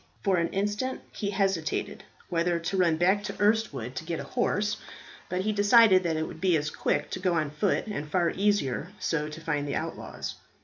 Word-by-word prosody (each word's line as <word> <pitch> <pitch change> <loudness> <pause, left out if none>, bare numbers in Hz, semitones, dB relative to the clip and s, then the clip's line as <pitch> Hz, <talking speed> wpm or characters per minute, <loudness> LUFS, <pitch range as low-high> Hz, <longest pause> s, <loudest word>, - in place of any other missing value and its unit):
For 195 -2 +3
an 170 0 +2
instant 205 +7 -2
he 205 - -3
hesitated 195 -5 -1 0.2
whether 170 0 +1
to 170 +3 -3
run 170 -4 +3
back 190 +4 +3
to - - -6
Erstwood 205 - +1
to 155 - -3
get 165 0 -3
a - - -4
horse; 210 -4 0 0.5
but 180 0 -1
he 215 +3 0
decided 205 -1 +6
that 165 -3 -1
it 160 - -1
would 160 - -10
be 180 -3 +4
as 150 0 -2
quick - - -1
to - - -3
go 180 -2 +1
on 155 -3 0
foot, 185 +6 0
and 175 -9 -5
far 170 0 +2
easier 195 -5 0
so 160 -4 -1
to 155 +1 -8
find 150 -3 -2
the 140 - -2
outlaws. - - -5
180 Hz, 205 wpm, -28 LUFS, 160-205 Hz, 0.5 s, decided